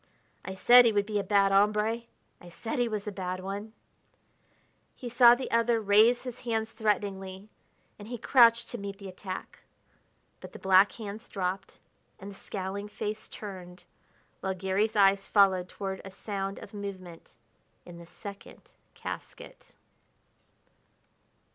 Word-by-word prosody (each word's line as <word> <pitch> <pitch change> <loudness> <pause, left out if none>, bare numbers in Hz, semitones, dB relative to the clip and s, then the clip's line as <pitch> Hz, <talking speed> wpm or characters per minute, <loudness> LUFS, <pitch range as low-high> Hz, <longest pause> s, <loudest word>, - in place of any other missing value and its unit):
I 190 - -6
said 245 +5 +7
he 230 - +5
would 205 -1 +1
be 210 -1 -1
a - - -2
bad 200 -1 +3
hombre; 210 +3 +2 0.4
I 175 - -12
said 225 +8 -5
he 245 - +2
was 215 -3 -4
a 210 - -4
bad 185 -2 -4
one 200 +3 -6 0.6
" - - -39 0.3
He 245 - -7
saw 240 0 +7
the 260 +1 -6
other 230 0 +2
raise 220 +4 +4
his 250 -2 -7
hands 225 -2 -2
threateningly, 200 -2 -2 0.5
and 205 - -10
he 245 +1 -5
crouched 235 -1 +4
to 240 - -5
meet 200 0 -6
the 200 -1 -9
attack. 185 0 -8 0.8
But - - -11
the - - -8
black 190 +1 +5
hands 215 0 -8
dropped, 190 0 -4 0.4
and 195 +2 -8
the - - -12
scowling 195 +1 -5
face 210 +1 -5
turned, 180 -3 -9 0.6
while 190 0 -3
Garry's 190 +4 0
eyes 195 -1 +4
followed 190 -3 +3
toward 195 -1 -5
a 195 - -8
sound 195 0 -5
of 200 - -11
movement 190 -7 -8 0.5
in 175 -1 -11
the 170 - -12
second 200 +2 -11 0.2
casket. - - -9
200 Hz, 150 wpm, -29 LUFS, 190-220 Hz, 0.8 s, said